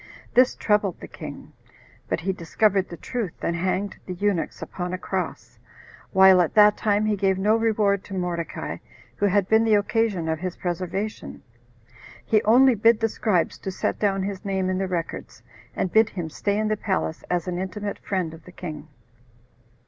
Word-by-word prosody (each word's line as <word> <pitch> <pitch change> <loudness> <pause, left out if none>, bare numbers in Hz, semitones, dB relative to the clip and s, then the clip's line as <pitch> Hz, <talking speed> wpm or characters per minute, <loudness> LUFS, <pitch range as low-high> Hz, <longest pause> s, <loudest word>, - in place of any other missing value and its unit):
This 255 +1 +5
troubled 210 -4 +1
the - - -9
king; - - -9 0.6
but - - -1
he 190 +3 -1
discovered 190 +3 +1
the 170 - -8
truth, 225 -5 -4
and 170 - 0
hanged 190 +3 -1
the 180 - -4
eunuchs 195 -2 -1
upon 180 0 -5
a - - -1
cross, - - -5 0.5
while 190 -1 +7
at 170 - -1
that 210 -1 +7
time 210 0 +1
he 215 -1 +1
gave 190 -1 +1
no 210 +3 +3
reward 210 -3 +1
to 195 - -7
Mordecai, 175 -2 -3 0.4
who 205 - +2
had 200 -1 +2
been 220 +1 +4
the 220 -2 +4
occasion 205 -4 0
of 160 -1 -1
his 185 0 -4
preservation. 185 +4 -4 0.8
He 215 -1 +3
only 255 +4 +6
bid 225 +1 +4
the 225 - +1
scribes 195 -5 0
to - - -5
set 185 - -2
down 195 -2 +1
his 195 -1 -4
name 190 -2 -1
in 185 - -1
the 195 - -1
records, 175 -2 -5 0.3
and 185 - -1
bid 220 0 +5
him 170 -4 -5
stay 200 +5 -1
in 215 0 0
the 215 - 0
palace, 190 -5 -2
as 180 0 -1
an 180 -1 -2
intimate 200 +2 -4
friend 185 -5 -2
of 165 - -13
the 180 - -12
king. 155 -4 -7
195 Hz, 185 wpm, -24 LUFS, 180-210 Hz, 0.8 s, while